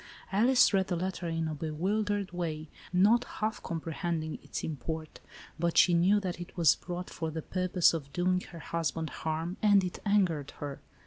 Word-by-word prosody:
Alice 235 +4 +5
read 190 -1 +2
the 180 - -1
letter 180 0 -3
in 165 -1 -1
a 155 - -3
bewildered 195 +7 -1
way, 160 -3 -4 0.2
not 205 +7 +5
half 215 -2 -3
comprehending 165 -1 -3
its - - -5
import, 155 +1 -5 0.4
but 170 0 0
she 180 - +6
knew 185 +5 +4
that 180 -3 -4
it 175 - -9
was 165 -3 +5
brought 180 0 -6
for 160 -1 -3
the 160 0 -5
purpose 185 -2 +2
of 140 -4 -5
doing 180 +2 +1
her 170 - -10
hus 165 0 -1
band 160 -1 -4
harm, 160 +3 -3
and 205 -2 +5
it 180 - -4
angered 185 -9 +1
her. 145 -2 -6
175 Hz, 180 wpm, -30 LUFS, 160-190 Hz, 0.4 s, she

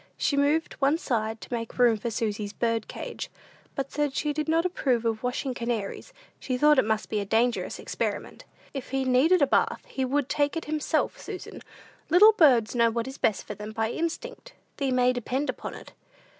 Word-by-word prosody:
She 285 - +1
moved 290 +3 +2
one 280 +3 +3
side 225 -7 -2
to - - -8
make 230 -1 -4
room 240 -2 +5
for 220 +3 -3
Susy's 215 -2 -3
bird 230 -2 -1
cage, - - -6 0.5
but 275 0 -3
said 295 -2 -1
she 300 -1 0
did 305 +1 -2
not 330 +2 +2
approve 255 -10 0
of 225 -1 0
washing 250 +1 -2
canaries; 235 - -4 0.3
she 255 -2 -2
thought 295 +1 +5
it - - +3
must 220 0 0
be 215 - -1
a - - -1
dangerous 230 +4 0
experiment. - - -4 0.3
"If 270 -3 -6
he 270 0 -1
needed 285 +7 +4
a - - +7
bath, - - +1
he 265 - -3
would 270 +1 0
take 290 +2 0
it 330 - -4
himself, 305 0 -1
Susan. - - -8 0.5
Little 410 +7 +8
birds 255 - +4
know 235 -1 +4
what 230 +1 -2
is 265 +1 -8
best 210 - +1
for - - -5
them 210 +1 -8
by 225 0 -1
instinct, 485 - -4 0.2
thee 275 -2 0
may 250 0 +3
depend 255 +4 -1
upon - - -8
it." - - -12
255 Hz, 200 wpm, -27 LUFS, 230-295 Hz, 0.5 s, Little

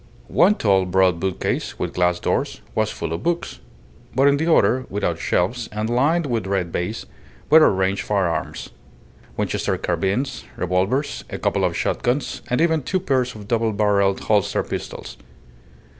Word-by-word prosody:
One 200 +4 +4
tall, 95 - +2
broad 90 -1 +3
bookcase, 95 +1 -2
with - - -3
glass 90 0 +1
doors, - - -1
was - - +1
full 85 -1 -4
of 85 - -4
books; 170 +6 -2 0.6
but 135 +2 +4
in 140 0 +4
the 160 +3 +1
other, 130 -1 +3
without 100 +1 -2
shelves, 115 +6 0
and 105 +2 -2
lined 150 +7 +2
with 115 -7 -2
red 95 -3 -1
baize, 90 +7 -3 0.5
were 160 - +9
arranged 95 0 0
firearms: 95 -5 -2 0.7
Winchester - - -1
carbines, 100 +8 -1
revolvers, 95 - -1
a - - -5
couple - - 0
of - - 0
shot - - -1
guns, 125 +4 -1
and 125 - +1
even 160 -2 +2
two 185 +8 -1
pairs 130 -8 0
of 105 -2 -10
double 115 -1 +1
barrelled 100 -2 +2
holster 105 -3 +1
pistols. - - -6
105 Hz, 160 wpm, -22 LUFS, 95-135 Hz, 0.7 s, were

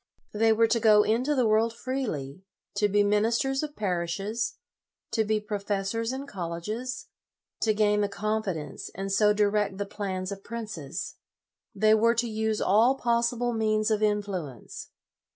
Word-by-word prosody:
They 225 +1 +3
were 225 +1 +4
to 230 +1 +2
go 210 -2 +6
into 250 +8 +1
the 255 -3 +2
world 220 +1 +2
freely, 210 - -4 0.4
to 210 0 +3
be 205 +1 +3
ministers 230 +6 +1
of 300 -1 -5
parishes, 195 +4 -2 0.6
to 220 - +2
be 215 0 +1
professors 205 +2 -2
in 265 +2 -5
colleges, 210 +5 -5 0.6
to 220 - +3
gain 210 -1 +3
the 205 - 0
confidence 200 -8 -3
and 195 +1 -4
so 210 +1 +4
direct 210 -1 +1
the 200 - -2
plans 190 -2 -4
of 195 0 -7
princes. 215 -11 -6 0.6
They 215 0 +4
were 230 +2 +4
to 235 +1 0
use 220 -1 -1
all 225 +7 +4
possible 240 0 0
means 215 -1 +1
of 215 -1 +1
influence. 200 - -3
215 Hz, 150 wpm, -27 LUFS, 200-230 Hz, 0.6 s, go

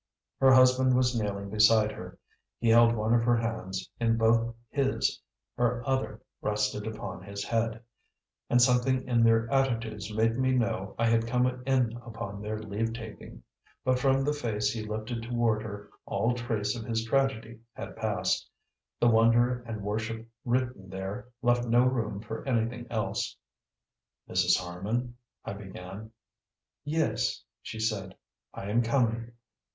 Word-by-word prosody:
Her 135 -1 +6
husband 130 0 +6
was 125 -1 +2
kneeling 100 -3 -2
beside 110 0 +5
her; - - -9 0.4
he 115 - +1
held 115 0 +6
one 110 +1 +1
of 120 - +4
her 120 0 +3
hands 110 -5 -3
in 115 -1 +2
both 115 +1 +3 0.2
his, 135 -2 0 0.3
her 120 0 0
other 130 0 -1 0.2
rested 105 0 -1
upon 110 -5 -6
his 100 +1 -6
head; 115 +1 -1 0.7
and 120 - +4
something 125 +1 +3
in 120 -2 +3
their 115 0 +4
attitudes 115 -6 0
made 115 +2 +1
me 130 0 +2
know 110 -6 -1
I 115 - +2
had 115 0 +2
come 125 +1 +2 0.2
in 130 -4 +2
upon 110 -4 -7
their 105 +1 -3
leave 110 +1 -3
taking. 110 -2 -9 0.4
But 130 -1 +2
from 135 +1 +3
the 145 +2 +1
face 105 -7 -1
he 115 - -4
lifted 110 +2 -4
toward 115 -2 +1
her 105 -1 -8 0.2
all 120 +2 +1
trace 120 -3 -1
of 115 - -5
his 115 0 -2
tragedy 120 -3 0
had - - -8
passed: - - -1 0.5
the 120 - +4
wonder 120 +2 +4
and 110 -3 -5
worship 110 +2 -3 0.2
written 125 -5 -1
there 95 +6 -5 0.2
left 120 0 +2
no 120 +1 +5
room 115 -6 0
for 110 0 -6
anything 120 -1 -1
else. 110 -3 -2 0.9
"Mrs. - - +3
Harman 105 +8 -3 0.2
" - - -42
I - - -4
began. 95 +1 -9 0.7
"Yes?" 155 +2 0 0.2
she 110 - -7
said. 105 -4 -2 0.4
"I 100 +1 -6
am 120 +3 +3
coming." 115 -1 0
115 Hz, 150 wpm, -29 LUFS, 110-120 Hz, 0.9 s, Her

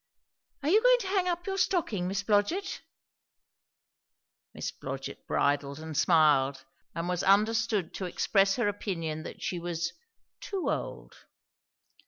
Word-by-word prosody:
"Are 290 - +1
you 420 +6 +5
going - - +6
to 390 - -4
hang 380 -2 +1
up 350 -1 -2
your 390 0 -2
stocking, 225 - 0
Miss 195 +1 -2
Blodgett?" 210 - 0 1.7
Miss - - -4
Blodgett - - -7
bridled 140 0 +1
and 160 0 -7
smiled 150 -5 +3 0.3
and 165 +1 -2
was 180 -1 -1
understood 215 -1 +2
to 190 - -4
express 195 +2 +2
her 240 -3 +1
opinion 165 -6 -3
that - - -9
she 180 - -2
was 170 -1 -3 0.5
"too 390 -3 -2
old." - - -5
195 Hz, 135 wpm, -29 LUFS, 165-250 Hz, 1.7 s, going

